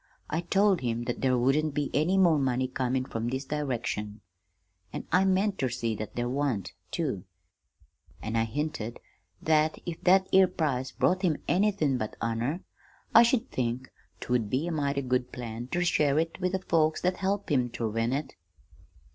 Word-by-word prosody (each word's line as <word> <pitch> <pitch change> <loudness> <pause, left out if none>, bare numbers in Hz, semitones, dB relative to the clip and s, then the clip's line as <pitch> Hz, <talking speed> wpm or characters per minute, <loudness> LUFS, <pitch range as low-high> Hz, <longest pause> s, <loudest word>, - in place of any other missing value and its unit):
I 160 - 0
told 195 +1 +2
him 120 -1 -1
that 120 0 -3
there 130 -1 +3
wouldn't 140 +4 +1
be 145 -1 -1
any 175 +6 +2
more 170 -5 +5
money 130 -1 +1
comin' 130 0 -1
from 115 -2 -3
this 130 +2 -3
direction 125 -7 -3 0.7
(an' - - -5
I 185 +3 +4
meant 195 +1 +1
ter 130 - +1
see 115 -2 -2
that 110 -1 -6
there 120 0 -1
wan't, 130 -5 -1 0.2
too!), 130 - -2 1.0
an' 110 +1 -4
I 115 0 +2
hinted 120 -2 -4 0.4
that 155 0 +2
if 170 -2 -6
that 190 +1 +5
'ere 190 0 +7
prize 135 -7 -1
brought 185 +1 +1 0.3
anythin' 180 -8 +2
but 110 - -4
honor, 115 +9 -1 0.5
I - - +10
should 240 +1 +2
think 125 +1 -2 0.3
't - - -6
would 115 -4 +1
be 130 +7 0
a 175 - -2
mighty 140 -3 -1
good 125 -1 0
plan 120 -1 -6
ter 175 +6 0
share 150 -4 +2
it 165 +3 -1
with 180 +1 0
the 190 - +1
folks 155 -1 +2
that 180 0 +1
helped 195 -1 -1
him 125 -4 +2
ter 115 -1 -3
win 115 +2 -1
it. 140 +2 -2
140 Hz, 180 wpm, -28 LUFS, 120-170 Hz, 1.0 s, I